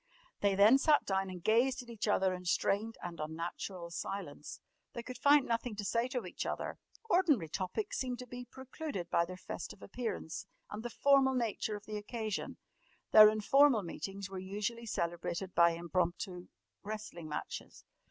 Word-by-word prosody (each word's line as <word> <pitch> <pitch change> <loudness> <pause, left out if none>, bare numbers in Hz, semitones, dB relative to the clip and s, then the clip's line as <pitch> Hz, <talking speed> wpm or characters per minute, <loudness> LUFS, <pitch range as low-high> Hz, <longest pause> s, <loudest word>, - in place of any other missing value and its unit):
They 200 -1 +2
then 215 +7 +7
sat 300 0 +4
down 195 -1 0
and 180 -2 -8
gazed 250 +5 +3
at 240 - -15
each 220 -1 -3
other 190 -2 +3
in 180 0 -6
strained 210 +5 +1
and 175 -2 -6
unnatural 170 +3 -5
silence. 195 +3 -5 0.3
They 235 - -5
could 255 +1 -8
find 285 -1 +6
nothing 230 -1 -1
to 205 0 -4
say 230 +4 +1
to 255 -2 -3
each - - -4
other. - - -4 0.3
Ordinary 330 - +3
topics 195 - -3
seemed 250 -2 -2
to 250 - -7
be 245 0 -8
precluded 260 - -6
by 170 - +3
their 185 +1 -8
festive 190 - -7
appearance 195 -6 -4 0.2
and 210 - -5
the 240 - -4
formal 270 +1 +4
nature 225 -3 -1
of 205 0 -9
the 215 0 -4
occasion. 215 0 -4 0.5
Their 215 -1 +10
informal 225 +2 +4
meetings 195 +3 -5
were 190 -1 -6
usually 210 +5 -4
celebrated 175 0 -2
by 170 0 +5
impromptu 175 +1 -2 0.3
wrestling 205 -6 -6
matches. 150 - -6
210 Hz, 165 wpm, -33 LUFS, 185-245 Hz, 0.5 s, Their